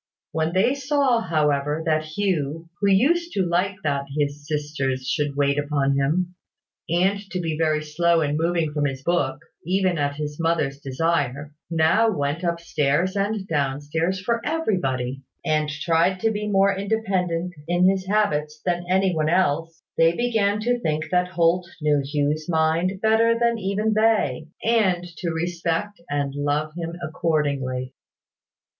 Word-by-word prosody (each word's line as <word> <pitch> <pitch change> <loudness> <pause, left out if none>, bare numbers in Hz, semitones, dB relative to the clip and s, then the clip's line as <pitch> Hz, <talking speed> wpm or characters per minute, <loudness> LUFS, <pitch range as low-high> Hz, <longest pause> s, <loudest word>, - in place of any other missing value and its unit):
When 160 0 0
they 195 +8 +3
saw, 275 -3 +2
however, 150 -3 0
that 155 -1 +1
Hugh, 165 -2 -2
who 200 - +1
used 335 - +3
to 195 - +1
like 180 +3 0
that 140 -2 -1
his 145 0 -2
sisters 145 -4 -2
should 145 -1 -1
wait 140 0 +2
upon 145 -2 +1
him, 165 +6 0 0.6
and 185 +4 +2
to 185 - -3
be 165 -3 -2
very 155 -1 +1
slow 165 +2 +2
in 145 -1 0
moving 165 -1 0
from 150 -1 0
his 135 -1 -3
book, 140 -6 0 0.3
even 185 -1 +1
at 145 0 0
his 150 0 -5
mother's 160 -4 0
desire, 145 0 -1 0.2
now 170 +7 +3
went 145 -3 -2
up 170 -1 0
stairs 165 +3 0
and 200 0 -1
down 140 -4 0
stairs 160 +6 -1
for 230 +5 -1
everybody, 135 - -1 0.2
and 155 -1 +1
tried 165 +4 +1
to 225 - +2
be 210 0 -3
more 195 -1 +3
independent 190 -4 -1
in 175 +1 +3
his 190 0 +1
habits 155 -8 0
than 175 -1 -1
any 190 0 +3
one 155 -1 0
else, 165 -2 0 0.2
they 165 +1 +5
began 215 -3 +1
to 245 +2 +1
think 155 -6 -2
that 180 0 +2
Holt 175 0 +1
knew 150 -2 +2
Hugh's 150 +3 -1
mind 165 +4 +1
better 225 +1 +3
than 235 -1 +1
even 210 +2 0
they, 215 - +2 0.2
and 200 -6 +2
to 170 - -2
respect 170 +4 -2
and 145 -1 -1
love 145 +2 -1
him 170 -1 -4
accordingly. 140 -6 -1
165 Hz, 155 wpm, -23 LUFS, 150-190 Hz, 0.6 s, they